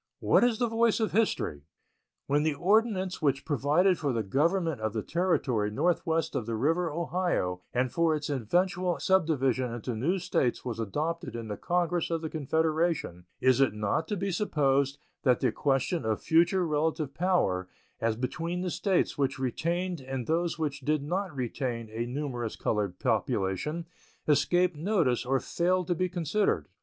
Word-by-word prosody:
What - - +4
is 240 -2 +3
the 245 - +1
voice 230 0 +2
of 220 - 0
history? 205 - 0 0.6
When 145 +1 +2
the 155 -1 +1
ordinance 190 0 +1
which 140 -3 +1
provided 155 +6 +2
for 145 -3 0
the 115 -3 -1
government 160 - +1
of 110 -1 -1
the 110 - -2
territory 135 - 0
northwest 165 +6 0
of 115 - -2
the 115 - -1
river 165 +9 +1
Ohio 165 - -1
and 125 0 0
for 165 +2 +2
its 150 -1 -4
eventual 175 - 0
subdivision 135 -9 +2
into 120 0 -4
new 155 - 0
States 170 -10 0
was 115 -3 -4
adopted 155 - -3
in 115 -2 -5
the 105 - -3
Congress 175 - 0
of 165 -1 -2
the 160 - -4
Confederation, 160 - 0
it - - -1
is 130 +1 +4
not 105 +4 +1
to 210 - -2
be 195 +1 -1
supposed 140 -7 +1 0.2
that 125 -3 +3
the 125 - +2
question 135 +5 0
of 110 -1 0
future 175 +3 +3
relative 155 -2 -1
power 160 - +1 0.3
as 115 -1 0
between 165 +9 -3
the 180 -1 -2
States 190 -5 0
which 140 0 +1
retained 170 +6 -2
and 130 -2 -4
those 170 +4 0
which 145 -3 -2
did 150 +1 0
not 180 +2 -2
retain 120 -3 -3
a 115 +2 -3
numerous 125 -4 -3
colored 100 -4 -1
population 100 - -1 0.4
escaped 175 +4 +3
notice 150 - +1
or 135 +1 +2
failed 180 +4 0
to 175 - +1
be 185 +2 -1
considered. 180 +4 0
155 Hz, 165 wpm, -29 LUFS, 125-175 Hz, 0.6 s, What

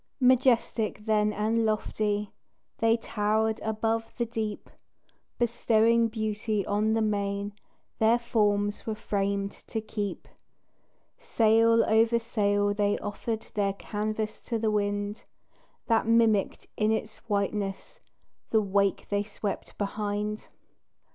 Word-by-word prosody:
Majestic 245 -4 +2
then 210 -1 +2
and 220 +2 0
lofty 210 -1 -1 0.5
They 225 0 +3
towered 220 0 0
above 225 +1 -1
the 240 - 0
deep, 220 -2 -4 0.7
Bestowing 230 -1 +3
beauty 215 -2 -2
on 210 +2 +1
the 225 0 +2
main 200 -1 -1 0.5
Their 225 +2 +5
forms 205 -3 0
were 220 - -1
framed 200 -1 -1 0.2
to 225 - -2
keep. 210 -2 -5 0.9
Sail 230 +1 +4
over 225 +2 +4
sail 205 -3 +1
they 205 0 +1
offered 220 +2 -4
Their 200 -2 +1
canvas 215 +1 -3
to 230 - -2
the 220 -1 0
wind, 205 0 -2 0.6
That 225 -1 +2
mimicked 225 -3 +2
in 215 0 +2
its 220 0 -2
whiteness 200 -1 -2 0.5
The 220 - +4
wake 200 -1 +1
they 205 0 +1
swept 205 0 -5
behind. 210 +1 -3
215 Hz, 115 wpm, -28 LUFS, 205-225 Hz, 0.9 s, Their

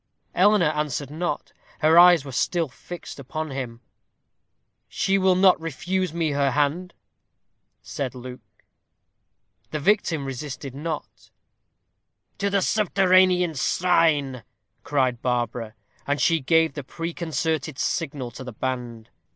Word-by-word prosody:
Eleanor 195 -3 +4
answered 150 -2 -3
not. 175 +3 -3 0.3
Her 160 +2 +6
eyes 175 -4 +7
were 135 - -7
still 165 +6 0
fixed 150 +3 -10
on 155 +1 -4
him. 125 -3 -5 1.1
"She 195 +1 +1
will 190 -1 +4
not 185 -3 +5
refuse 180 +3 -2
me 165 -2 -1
her 140 -1 +1
hand," 150 +6 -1 0.9
said 130 -2 -4
Luke. 125 -5 -11 1.1
The 155 - -3
victim 165 -4 +1
resisted 135 0 -6
not. 155 +2 -6 1.1
"To 200 0 +1
the 200 -1 +1
subterranean 185 -4 +3
shrine," 145 -4 +1 0.4
cried 130 -4 0
Barbara. 120 -2 -2 0.3
And 145 +1 0
she 165 -1 +3
gave 160 +3 +2
the 145 - -6
preconcerted 160 -1 -3
signal 140 -7 -2
to 125 - -9
the 125 -2 -8
band. 120 -2 -5
155 Hz, 120 wpm, -24 LUFS, 130-175 Hz, 1.1 s, eyes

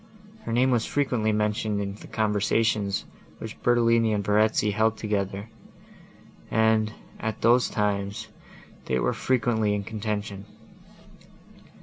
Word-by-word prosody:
Her - - -3
name 125 +3 +3
was 120 -2 +2
frequently 125 -6 0
mentioned 105 0 0
in 100 -1 -3
the 105 - -12
conversations, 105 -1 0 0.3
which 110 -1 -8
Bertolini 115 -2 +3
and 100 -1 -1
Verezzi 105 0 +3
held 110 +2 +1
together, 100 -1 -2 1.0
and, 110 -1 +2 0.3
at 110 -1 -4
those 120 +2 +4
times, 105 +1 -1 0.6
they 65 - 0
were - - +1
frequently 110 -4 +1
in 100 - -3
contention. 105 -2 -4
110 Hz, 115 wpm, -26 LUFS, 105-115 Hz, 1.0 s, those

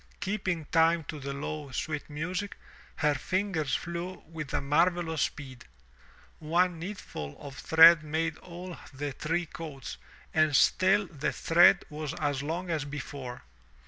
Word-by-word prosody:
Keeping 190 -5 -2
time 165 0 +4
to 155 - -5
the 140 0 -5
low, 145 +1 -5
sweet 150 +4 -4
music, 180 +7 -3 0.4
her 150 -1 +2
fingers 180 -1 -1
flew 170 +2 -5
with 155 -3 -7
a - - +1
marvelous 165 +2 +1
speed. 130 -5 -4 0.7
One 170 +2 +1
needleful 165 - -7
of 140 -2 -9
thread 160 0 +8
made 160 +1 -1
all 180 0 -9
the 145 +1 -4
three 165 +6 -1
coats 155 -5 -8 0.4
and 155 -2 +3
still 190 +7 +4
the 150 -5 -3
thread 170 +2 +5
was 150 -1 -4
as 145 -2 -1
long 170 +5 -3
as 155 -3 0
before. 140 -3 -7
160 Hz, 140 wpm, -29 LUFS, 145-175 Hz, 0.7 s, thread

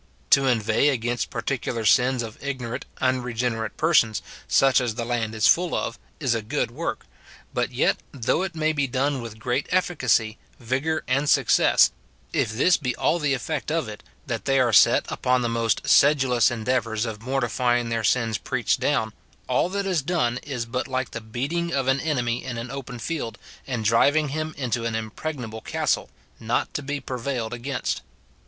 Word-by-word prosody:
To 135 -1 +6
inveigh 120 +4 +3
against 120 -2 -1
particular 120 -4 -3
sins 125 +2 +4
of 110 +2 -9
ignorant, 130 -4 -4
unregenerate 125 -3 -1
persons, 120 - +3 0.2
such 135 -1 +4
as 120 -4 -2
the 120 0 -3
land 115 -2 -2
is 110 - +1
full 175 0 +4
of, - - -3 0.2
is 135 -6 +1
a 115 - -1
good 120 +2 -2
work; 160 +7 -4 0.5
but - - -1
yet, - - +2
though 140 +5 0
it 190 -3 -3
may 155 0 +1
be 145 -2 0
done 135 +1 0
with 115 -2 -8
great 125 +4 -1
efficacy, 130 -11 +1 0.2
vigour, 135 +6 -1
and 140 +3 +1
success, - - +5 0.4
if - - +1
this 145 +11 +3
be 125 -4 -2
all 175 - +1
the 145 -3 +1
effect 150 +4 -3
of 160 -6 0
it, 105 -1 -8 0.2
that 115 -4 -4
they 135 -1 +3
are 120 -3 +2
set - - +6
upon 125 0 +1
the 120 - 0
most 115 -1 0
sedulous 135 -5 +5
endeavours 115 -1 -1
of 110 -2 -6
mortifying 120 -1 0
their 115 -1 -1
sins 115 -1 +1
preached - - 0
down, - - 0 0.3
all - - +1
that 200 +1 -2
is 185 -5 +1
done 135 -6 0
is 130 -5 -4
but 125 +3 -3
like 130 -1 -2
the 120 - -5
beat 120 +7 -4
ing 170 0 -1
of 135 -3 0
an 135 +1 +3
enemy 125 -6 -1
in 125 -2 -5
an 120 +1 -5
open 135 -3 -6
field, 120 -2 -4 0.3
and 120 -5 -3
driving 145 +7 +3
him 155 +2 -3
into 120 -3 -1
an 115 -1 -2
impregnable 110 +1 -5
castle, - - -1 0.3
not 115 +2 -1
to - - -2
be 145 +1 -3
prevailed 125 -3 -3
against. 125 +1 -3
125 Hz, 180 wpm, -24 LUFS, 115-140 Hz, 0.5 s, To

